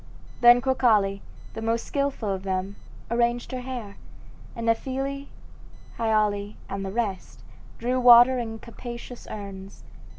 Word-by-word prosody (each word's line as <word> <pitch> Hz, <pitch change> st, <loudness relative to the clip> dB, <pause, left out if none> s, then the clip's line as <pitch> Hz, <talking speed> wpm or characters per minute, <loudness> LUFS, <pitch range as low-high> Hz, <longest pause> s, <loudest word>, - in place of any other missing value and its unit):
Then 240 Hz, 0 st, +7 dB
Crocale, 220 Hz, -7 st, +2 dB, 0.3 s
the 225 Hz, -, -6 dB
most 230 Hz, +1 st, -1 dB
skilful 280 Hz, -6 st, -2 dB
of 190 Hz, -, -4 dB
them, 190 Hz, +1 st, -3 dB, 0.4 s
arranged 240 Hz, 0 st, 0 dB
her 255 Hz, -1 st, -4 dB
hair, 245 Hz, -6 st, -7 dB, 0.6 s
and 230 Hz, -, -5 dB
Nephele, 270 Hz, +4 st, -1 dB, 0.7 s
Hyale, 210 Hz, -2 st, +1 dB
and 195 Hz, 0 st, -4 dB
the 190 Hz, -, -4 dB
rest 205 Hz, -4 st, -3 dB, 0.4 s
drew 250 Hz, +2 st, 0 dB
water 245 Hz, +1 st, +8 dB
in 225 Hz, -2 st, -4 dB
capacious 235 Hz, +1 st, -9 dB
urns. 195 Hz, -2 st, -8 dB
230 Hz, 125 wpm, -25 LUFS, 205-245 Hz, 0.7 s, water